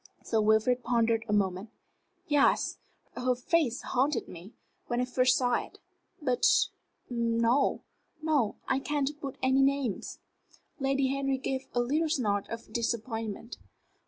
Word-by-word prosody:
Sir 220 -1 +1
Wilfrid 220 +4 +3
pondered 230 -2 +2
a - - 0
moment. 195 0 0 0.6
"Yes. 290 -1 +2 0.4
Her 250 0 +1
face 255 -1 0
haunted 260 0 0
me, 180 +5 -11 0.3
when 240 0 -1
I 250 - +1
first 255 0 +3
saw 245 -1 +1
it. - - -14 0.4
But 255 -5 -1 0.7
no; 235 +2 +1 0.4
no, 300 -9 +1
I 265 - +2
can't 285 0 -1
put 275 -2 -5
any 260 +1 +4
names." 270 -6 0 0.6
Lady 270 0 +1
Henry 275 0 0
gave 265 0 -3
a 245 - +3
little 305 +6 +1
snort 210 -10 0
of 230 0 -8
disappointment. 225 -1 -3
250 Hz, 130 wpm, -29 LUFS, 230-275 Hz, 0.7 s, any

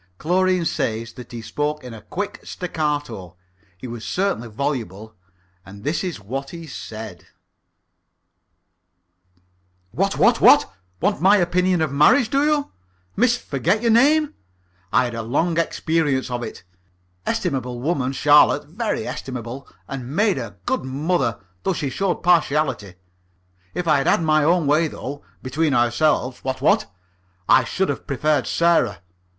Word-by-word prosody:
Chlorine 180 - +1
says 115 -5 -2
that 125 - -11
he 115 -2 -7
spoke 150 +4 -2
in 125 -2 -8
a 110 - -10
quick 205 - -5
staccato. 145 - -4 0.4
He 90 - -10
was 120 -2 -7
certainly 185 - -1
voluble, 110 -4 -4 0.5
and 100 +2 -13
this 155 +6 -1
is 180 - -4
what 135 +7 -5
he 170 -1 -8
said: 110 - -8 2.6
"What, - - 0
what, - - +4
what? - - +6 0.3
Want 200 +4 +1
my 195 +3 +6
opinion 180 -1 +2
of 155 - -1
marriage, 180 - +4
do 275 +1 +2
you, 300 -1 +1 0.4
Miss 245 +3 +3
Forget 175 - -1
your 230 - +3
name? 290 +6 +4 0.6
I - - +4
had 120 -1 -3
a 115 - -3
long 160 +9 0
experience 160 -6 0
of 120 0 -2
it. 120 - -7 0.6
Estimable 125 -2 -2
woman, 135 -2 -1
Charlotte, 145 +1 +4
very 220 +7 -3
estimable, 125 +1 -6 0.2
and 135 +1 -6
made 205 -5 +2
a 110 -5 -7
good - - -1
mother, 135 - -1 0.2
though 190 - 0
she 145 -6 -3
showed 195 +2 -1
partiality. 150 - +1 0.8
If 180 - -3
I'd 145 -3 +3
had - - +3
my 155 -1 +3
own 170 +1 +3
way 155 +3 +3
though 145 -1 -7 0.2
between 145 +2 0
ourselves, 125 +2 +1
what, 130 0 -3
what? 135 - +2 0.6
I 130 - +6
should 190 +9 -1
have 140 - -4
preferred 145 +1 +1
Sarah. 170 - +2
145 Hz, 145 wpm, -22 LUFS, 125-175 Hz, 2.6 s, what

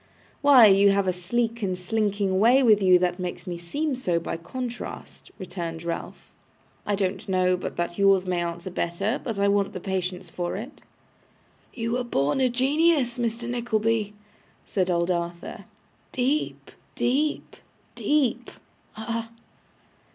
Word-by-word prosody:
'Why, 275 -5 +8
you 200 0 +6
have 195 -1 +2
a 185 - +2
sleek 230 +6 -2
and 185 -3 -1
slinking 200 0 0
way 245 +6 +5
with 215 -4 +5
you 185 -1 +6
that 180 0 0
makes 180 -1 -5
me 180 - -4
seem 285 - -2
so 180 -10 0
by 165 - -4
contrast,' 245 +8 -7
returned 170 -4 -6
Ralph. 170 0 -6 0.6
'I 205 - +2
don't 195 0 -2
know 185 -1 +3
but 180 - -5
that 175 +2 -3
yours 195 -1 +4
may 180 -1 0
answer 170 +1 -4
better, 195 +8 -2
but 225 -4 -4
I 200 0 +2
want 200 0 +1
the 185 - -5
patience 185 -1 -3
for 175 +1 -4
it.' 230 +8 -8 0.9
'You 230 -2 -3
were 250 +1 0
born 145 - 0
a 255 - +4
genius, 270 0 +2
Mr. 235 0 -2
Nickleby,' 225 -3 0 0.5
said 185 -2 -1
old 170 0 +1
Arthur. 170 0 -4 0.5
'Deep, 270 +4 -1 0.2
deep, 290 +5 0 0.4
deep. 255 -5 0 0.5
Ah! 230 +1 -4
200 Hz, 145 wpm, -25 LUFS, 180-240 Hz, 0.9 s, Why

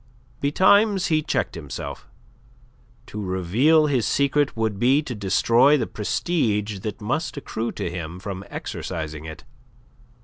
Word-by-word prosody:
Betimes 190 +7 +3
he 155 -1 +3
checked 135 -5 -1
himself. 75 -6 -7 1.0
To 105 - -7
reveal 105 - +3
his 135 -6 +1
secret 140 -1 +1
would 110 -3 -1
be 135 +6 +3
to 130 - -5
destroy 115 +7 +4
the 120 - -1
prestige 105 - -1
that 110 +3 -6
must 150 +10 -2
accrue 115 -4 -3
to - - -4
him 85 0 -6
from 95 0 -6
exercising 80 -3 -5
it. 80 0 -9
115 Hz, 130 wpm, -23 LUFS, 95-145 Hz, 1.0 s, destroy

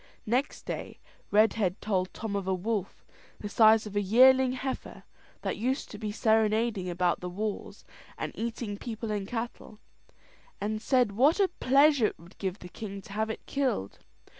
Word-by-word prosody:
Next 250 +6 -1
day, - - -6 0.3
Redhead 210 -2 +3
told 185 -3 -1
Tom 215 -2 -5
of 195 -2 -2
a 190 - +1
wolf, 200 +1 -3 0.3
the 210 - -5
size 220 +1 +5
of 210 -1 -8
a 205 - +2
yearling 255 +5 +5
heifer, 260 +1 -5 0.4
that - - -2
used 255 +5 -2
to 210 - -8
be 215 -1 -3
serenading 220 -2 +1
about 175 0 +1
the 180 - -5
walls, 210 +3 -5 0.3
and - - -4
eating 225 -2 -4
people 225 -2 -5
and 205 -2 -2
cattle; 225 -1 -5 0.8
and 215 +1 -2
said 250 -4 +2
what 275 - +3
a 390 -2 +4
pleasure 280 -5 +4
it - - -7
would 170 +4 -17
give 190 -1 -2
the 180 - -10
king 200 +1 -7
to 195 - -11
have 220 +1 -1
it 220 - -6
killed. 260 - -2
215 Hz, 170 wpm, -29 LUFS, 200-240 Hz, 0.8 s, size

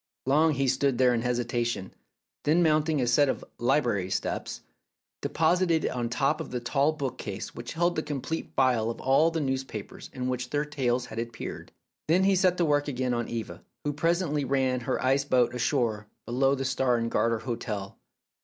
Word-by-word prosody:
Long 155 +4 +4
he 135 0 +1
stood 130 0 +1
there 125 -1 +4
in 115 - 0
hesitation; 120 -4 -1 0.5
then, 160 +4 +3
mounting 155 -1 +2
a 125 - +1
set 135 +4 +4
of - - -3
"library 120 -7 +1
steps," 95 - -3 0.6
deposited 165 0 +2
it - - 0
on 120 -1 -2
the - - -2
top 140 +5 +1
of - - -6
the 125 - -3
tall 140 +5 +1
bookcase 130 -9 -5
which 120 - -7
held 175 +2 +1
the - - 0
complete 150 +2 -4
file 125 -4 +2
of 115 - -5
all 135 +5 +4
the 165 -1 -2
news 135 -2 -1
papers 110 -6 -8
in 125 -1 -4
which 125 -1 -2
their 145 +2 0
tales 130 -4 -1
had 110 -1 -6
appeared. 115 0 -6 0.4
Then 175 +4 +4
he 195 0 +4
set 185 -1 +3
to 175 - +2
work 145 -1 +2
again 130 -2 -1
on 120 -1 -2
Eva, 115 -2 -5 0.2
who 145 - -1
presently 165 -1 0
ran 130 -1 +1
her 125 +1 -2
ice 135 +2 +3
boat 125 -3 +2
ashore 120 -4 0 0.2
below 135 +3 +2
the 135 0 -3
Star 130 -2 +1
and 115 0 -2
Garter 115 0 +2
hotel. 110 -5 -5
130 Hz, 190 wpm, -28 LUFS, 120-150 Hz, 0.6 s, Long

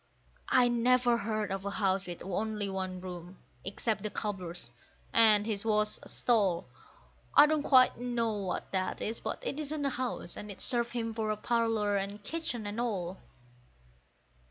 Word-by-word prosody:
I 250 -1 +5
never 240 0 +3
heard 215 -2 -2
of 195 0 -3
a 200 - -2
house 195 -2 0
with 175 -1 -7
only 210 +2 -2
one 185 -1 -4
room, 180 0 -8 0.3
except 210 +2 -2
the 210 - -2
cobbler's, 180 - -3 0.4
and 215 -2 +6
his 210 -3 +1
was 210 -1 +2
a - - -12
stall. 200 -8 +1 0.7
I 290 - +10
don't 305 0 +1
quite 255 -4 +5
know 240 -2 -1
what 190 -3 -4
that 185 -1 -1
is; 225 +2 -2
but - - -5
it 295 - -2
isn't 300 -1 -2
a 275 - +1
house, 245 -9 -3
and 210 - -7
it 200 - -8
served 240 -2 +2
him 230 -2 -2
for 215 -1 -1
parlour 225 -2 +1
and 200 +1 -4
kitchen 250 -5 -3
and 205 +3 -3
all. 190 -6 -3
215 Hz, 165 wpm, -31 LUFS, 195-240 Hz, 0.7 s, I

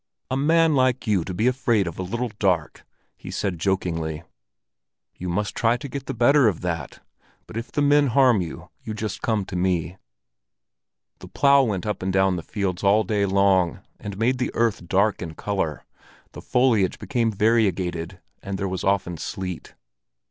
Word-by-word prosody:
"A - - +1
man 160 +3 +3
like 130 -2 +2
you 100 -6 +1
to 95 - -6
be 95 +6 -1
afraid 120 -5 +2
of 85 0 -6
a - - -1
little 120 +6 -3
dark!" 90 -6 0 0.3
he - - -11
said 90 -4 -3
jokingly. 80 -4 -1 0.9
"You 90 - -6
must 105 +4 -1
try 115 +1 +2
to 140 - -7
get 140 0 -7
the - - -4
better 125 +2 +5
of 100 -6 0
that. 85 -6 -4 0.4
But - - -12
if 115 +1 -5
the 145 - 0
men 145 0 +4
harm 125 -4 +4
you, 85 - -7
just 110 -2 -4
you - - -23
come 110 -4 0
to 95 - -7
me." 90 -1 -1 1.2
The - - -11
plough 140 0 +4
went 105 -8 -1
up 105 -1 -3
and 95 +1 -1
down 95 0 +2
the 85 - -4
fields 95 +1 -3
all 100 +2 +4
day 100 0 0
long, 95 -3 +2 0.2
and 100 -2 -7
made 120 +4 +1
the 125 - 0
earth 115 -6 0
dark 100 +4 +2
in 80 -3 -6
color, 90 -8 -3 0.5
the - - -10
foliage 125 -7 +2
became 120 -5 -1
variegated, 95 -5 0 0.2
and 100 0 -4
there 100 0 -2
was 95 -1 -4
often 95 -3 0
sleet. 90 0 -6
100 Hz, 180 wpm, -24 LUFS, 90-120 Hz, 1.2 s, better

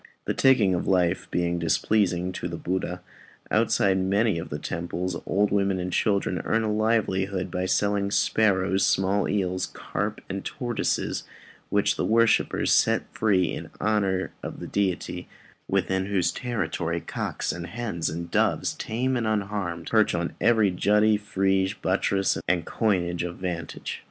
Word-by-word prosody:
The - - 0
taking 120 -8 +4
of 85 - -2
life 90 -1 +1
being 85 0 0
displeasing 90 +1 +1
to 90 - -4
Buddha, 90 +1 -3 0.5
outside 95 -1 +3
many 100 0 +1
of 85 - -7
the 75 - -3
temples 85 +3 -3
old 100 +1 +2
women 100 -1 +1
and 90 0 -3
children 100 -3 +1
earn 115 0 +1
a 105 -1 0
livelihood 100 -4 0
by 90 0 -1
selling 100 +1 +1
sparrows, 95 -2 +2
small 95 +2 +2
eels, 95 -2 0
carp, - - -4
and 95 0 -4
tortoises, 120 -2 -2 0.5
which - - +2
the - - 0
worshipper 115 0 +3
sets - - +3
free 95 -5 +1
in - - -6
honour 100 -3 0
of - - -7
the - - -6
deity, 90 -2 -2 0.4
within 95 0 0
whose 90 -4 +1
territory 85 -8 -2
cocks - - -3
and 85 0 -6
hens 105 -5 -3
and 85 +1 -5
doves, - - +1
tame 125 +4 -2
and 120 -3 0
unharmed, 100 -5 -2
perch 110 -4 +3
on 85 0 -2
every 110 -3 +4
jutty, 105 +4 +3
frieze, 95 -1 0
buttress, 95 0 +1
and 90 -2 +1
coigne 90 -6 0
of 85 0 -4
vantage. 85 -3 -5
95 Hz, 145 wpm, -26 LUFS, 90-105 Hz, 0.5 s, taking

